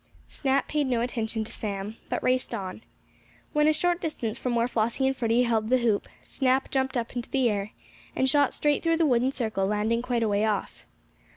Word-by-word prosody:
Snap 275 -1 0
paid 295 -2 0
no 245 -3 +1
attention 230 -2 -2
to 215 - -9
Sam, 205 +1 -4
but - - -2
raced 255 -1 +1
on. 195 +1 -6 0.7
When 300 0 +3
a - - +6
short 350 +3 +1
distance 235 -9 -3
from 250 -2 -1
where 235 0 +2
Flossie 235 +2 0
and 265 0 +2
Freddie 235 -1 +2
held 225 -2 0
the 255 - +5
hoop, 230 -5 +1 0.2
Snap 265 0 0
jumped 265 -1 0
up 235 +1 -3
into 240 -1 -4
the 265 -3 +2
air, 205 +1 -3 0.4
and 265 - +2
shot 285 +1 +3
straight 295 -1 +1
through 330 -1 +2
the 330 - +3
wooden 255 -1 +3
circle, 220 -7 -1
landing 215 +3 +1
quite 245 -2 0
a - - +2
way 205 0 +1
off. 215 -2 -2
240 Hz, 205 wpm, -27 LUFS, 220-265 Hz, 0.7 s, a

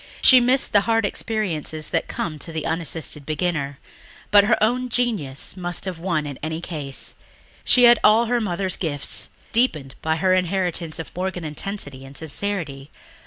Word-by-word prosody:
She 255 - +9
missed 255 +2 +2
the 205 - +6
hard 225 -1 +3
experiences 170 -9 -2
that 165 - 0
come 155 -3 -4
to 165 - -5
the 160 -2 -4
unassisted 160 -2 -2
beginner. 150 -2 -2 0.5
But 205 -1 +7
her 220 +1 +3
own 250 +3 +1
genius 215 - -1
must 175 -1 -4
have 185 -3 -4
won 165 -4 -1
in 140 -3 -6
any 160 +1 -3
case. 150 -6 -2 0.5
She 250 - +5
had 240 -1 +8
all 220 +3 +6
her 240 +1 +1
mother's 190 -2 -2
gifts, 145 -5 -3 0.2
deepened 155 - +1
by 160 0 +1
her 185 +3 +2
inheritance 180 -3 0
of 165 - -8
Morgan 185 -1 -3
intensity 150 -3 -4
and 135 +1 -10
sincerity 155 -4 -4
175 Hz, 165 wpm, -23 LUFS, 155-205 Hz, 0.5 s, She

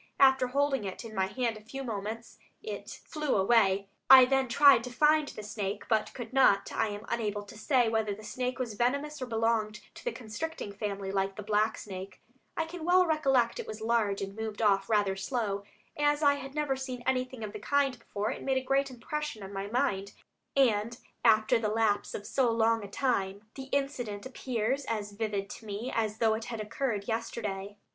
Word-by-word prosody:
After 265 -1 +6
holding 275 -1 +1
it 195 +4 -6
in 220 - -8
my 190 -2 +1
hand 235 0 -1
a - - -12
few 270 +5 -6
moments 225 0 -5 0.2
it 440 - -7
flew 305 -3 -1
away. 195 -1 +3 0.2
I 260 -1 +11
then 270 0 +2
tried 275 -1 +6
to - - -5
find 300 +3 +4
the 215 - -8
snake, 205 -1 -4
but 220 -2 +1
could 240 -1 -7
not. 255 -7 +4
I - - +1
am 205 +1 -6
unable 210 -3 -2
to 205 - -13
say 245 +3 +2
whether 220 -2 0
the 210 +2 -7
snake 250 +4 -3
was 245 -4 -3
venomous 280 +6 -1
or 255 - -3
belonged 225 -2 0
to - - -12
the - - -1
constricting 245 - -5
family, 200 -1 -4
like 195 0 -1
the 210 - -6
black 215 +1 +1
snake. 190 -1 -8 0.4
I 325 - +1
can 330 0 -8
well 365 +2 +5
recollect 270 -7 +2
it - - -5
was 215 0 -6
large 220 -3 +1
and 195 0 -6
moved 220 -1 -5
off 200 -2 +2
rather 205 -3 +2
slow. 200 -1 -2 0.3
As 295 +1 +2
I 285 -1 +6
had 275 0 -7
never 295 -3 0
seen 260 -2 -6
anything 255 -2 -1
of 210 -1 -5
the 210 - -6
kind 275 +1 +1
before, 210 -2 -3
it - - -6
made 265 -1 +1
a 260 - -1
great 275 +1 +1
impression 260 -1 -5
on 195 +1 -8
my 195 0 -3
mind, 205 -4 -1 0.4
and 230 -3 +2 0.3
after 220 +2 +5
the 215 -2 0
lapse 215 -1 +1
of 205 - -6
so 260 -3 +2
long 225 -1 +2
a - - -6
time, 200 -4 -1
the 270 - -7
incident 260 -7 -2
appears 260 0 -2
as 210 -2 -3
vivid 205 -2 -2
to 225 - -10
me 210 +5 -4
as 220 -1 0
though 225 -1 +3
it 220 +1 -3
had 230 -2 -5
occurred 210 -1 -2
yesterday." 205 -3 -3
225 Hz, 200 wpm, -30 LUFS, 205-265 Hz, 0.4 s, I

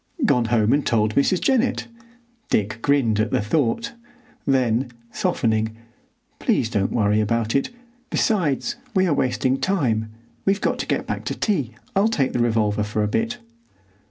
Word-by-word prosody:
"Gone 125 - +3
home 115 0 +2
and 145 0 +2
told 110 -2 +1
Mrs. 155 - +2
Jennett." 260 -2 +1 0.6
Dick 105 +2 0
grinned 125 -7 +2
at 110 0 +1
the - - +1
thought; 130 - 0 0.5
then, 130 -2 +2 0.2
softening, 110 - 0 0.6
"Please 130 - +1
don't 100 -4 0
worry 105 -1 +2
about 115 +1 0
it. 140 - +1 0.4
Besides, 170 - 0 0.2
we 190 0 +4
are 170 - +2
wasting 130 0 +1
time. 120 - 0 0.3
We've 195 +1 +2
got - - -1
to - - -3
get - - -1
back - - -4
to - - -2
tea. 140 - -1 0.2
I'll 200 +3 +4
take 145 -13 0
the - - 0
revolver 110 -3 +1
for 105 0 -1
a - - +1
bit." 225 - -1
120 Hz, 155 wpm, -22 LUFS, 110-160 Hz, 0.6 s, we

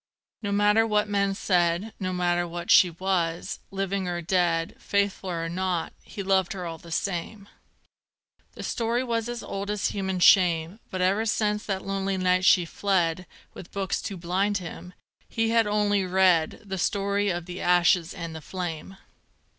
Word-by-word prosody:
No 205 -2 -3
matter 210 +2 +3
what 210 -1 +1
men 200 -1 0
said, 180 +2 +1
No 185 -2 -2
matter 175 -1 0
what 170 0 -4
she 180 - +7
was; 175 0 -2
living 195 -1 -2
or 175 -1 -2
dead, 170 -1 0
Faithful 200 -1 -1
or 165 -2 -2
not, 180 -1 -2
he 200 - -7
loved 190 -2 +1
her 185 -2 -6
all 165 -1 -6
the 170 - -13
same. 195 +4 -3 1.1
The - - -8
story 235 +2 -1
was 230 -2 -2
as 240 -1 -5
old 200 +1 -5
as 210 -1 0
human 190 -2 -2
shame, 175 +1 +4
But 185 - -3
ever 200 +5 +2
since 210 -1 0
that 195 -2 -3
lonely 195 0 -1
night 185 0 +2
she 180 -3 +5
fled, 180 -1 0 0.3
With 170 - -11
books 195 -2 -2
to 195 - -5
blind 190 +4 0
him, 180 0 -8 0.4
he 225 -1 0
had 230 -2 +3
only 205 -1 +2
read 180 -3 +2
The 190 -1 -4
story 200 +2 0
of 175 -2 -2
the 180 +1 -7
ashes 175 -1 +3
and 170 -2 -6
the 160 - -7
flame. 180 +2 -6
190 Hz, 170 wpm, -26 LUFS, 175-200 Hz, 1.1 s, she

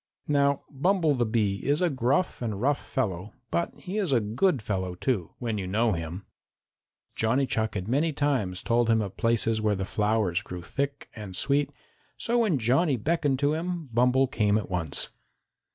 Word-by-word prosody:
Now 140 -1 +2
Bumble 165 +2 +2
the 120 -4 0
Bee 105 -3 +1
is 145 +2 +2
a 180 -2 +2
gruff 135 +7 0
and 110 -5 -2
rough 140 +5 +1
fellow, 100 -5 -3 0.2
but 170 - 0
he 195 +4 -4
is 190 -8 0
a 125 - +4
good 125 - +1
fellow, 95 -4 -3
too, 95 -3 -2
when 115 -4 -2
you 95 - -3
know 110 +4 +2
him. 85 +2 -4 0.9
Johnny 125 +5 +1
Chuck 110 -4 -1
had 95 -1 -3
many 145 +7 +2
times 130 -12 -1
told 120 0 +2
him 115 -1 +4
of 100 -3 -3
places 115 -1 +1
where 105 -1 +2
the 95 0 -3
flowers 105 -4 +1
grew 90 -2 -8
thick 140 +8 -3
and 105 -4 -7
sweet, 140 +6 +2 0.5
so 240 +1 +1
when 210 -10 +2
Johnny 130 +5 +2
beckoned 145 +2 +1
to 145 - +3
him, 170 -2 -3
Bumble 125 +3 +4
came 110 -6 +1
at 105 -3 -4
once. 85 -5 -1
120 Hz, 180 wpm, -27 LUFS, 105-145 Hz, 0.9 s, a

